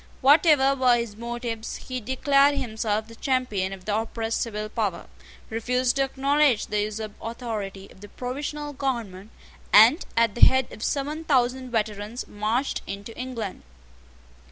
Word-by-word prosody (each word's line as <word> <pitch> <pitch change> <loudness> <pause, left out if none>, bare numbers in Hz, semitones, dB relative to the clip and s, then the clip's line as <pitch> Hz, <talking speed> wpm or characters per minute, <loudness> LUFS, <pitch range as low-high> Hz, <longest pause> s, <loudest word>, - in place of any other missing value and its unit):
Whatever 280 -1 +5
were 255 -3 +4
his 235 -3 -3
motives, 235 0 -5
he 255 -1 -6
declared 275 +4 +3
himself 220 -2 -2
the 230 - -12
champion 230 -6 -1
of 190 -2 -9
the 210 - 0
oppressed 225 0 -2
civil 215 -2 -3
power, 215 -4 -2 0.5
refused 250 +3 0
to 275 - +3
acknowledge 275 -2 +2
the 210 -1 -1
usurped 215 0 -5
authority 215 -5 -5
of 190 - -18
the 205 - -11
provisional 290 +5 -5
government, 230 -8 -3 0.4
and, 235 - +7
at 230 -2 +3
the 240 - -8
head 260 -1 +5
of - - -11
seven 295 +3 -2
thousand 255 -3 +1
veterans, 215 0 -3
marched 220 +6 -1
into 200 +3 -7
England. 240 -6 -5
235 Hz, 145 wpm, -25 LUFS, 215-260 Hz, 0.5 s, and